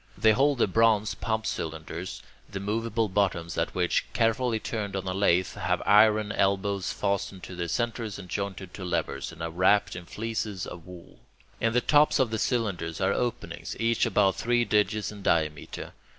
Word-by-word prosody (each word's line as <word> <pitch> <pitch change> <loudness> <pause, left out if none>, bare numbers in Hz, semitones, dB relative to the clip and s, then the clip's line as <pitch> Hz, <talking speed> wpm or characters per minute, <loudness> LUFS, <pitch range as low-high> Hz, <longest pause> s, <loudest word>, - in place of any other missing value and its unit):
They 110 - +5
hold 135 +5 +3
the - - +4
bronze 110 +1 +3
pump 110 -1 -2
cylinders, 80 +2 -5 0.3
the 100 - -5
moveable 115 +2 -1
bottoms 95 -4 0
of 80 - 0
which, 90 -1 +1
carefully 115 0 +1
turned 105 -3 -4
on 95 -1 -3
a 95 - -1
lathe, 95 -2 +2
have - - -1
iron 105 0 +5
elbows 100 -1 0
fastened 100 -2 -2
to 95 - -8
their 85 -1 -3
centres 115 +2 -2
and 95 -2 -9
jointed 95 0 -4
to 95 - -7
levers, 90 - -2
and 85 0 -8
are 85 - -3
wrapped 100 +5 +3
in 90 -2 -8
fleeces 110 -3 -3
of 85 0 -9
wool. 90 -2 -13 0.4
In 115 0 +1
the 125 - +3
tops 150 +2 +4
of 130 -5 +2
the 110 - -1
cylinders 100 - -1
are 95 +1 +2
openings, 120 -1 -3
each 115 +1 +2
about 100 -3 +2
three 120 0 +2
digits 105 -1 +1
in 105 -1 -10
diameter. 75 -5 -1
100 Hz, 180 wpm, -27 LUFS, 90-115 Hz, 0.4 s, They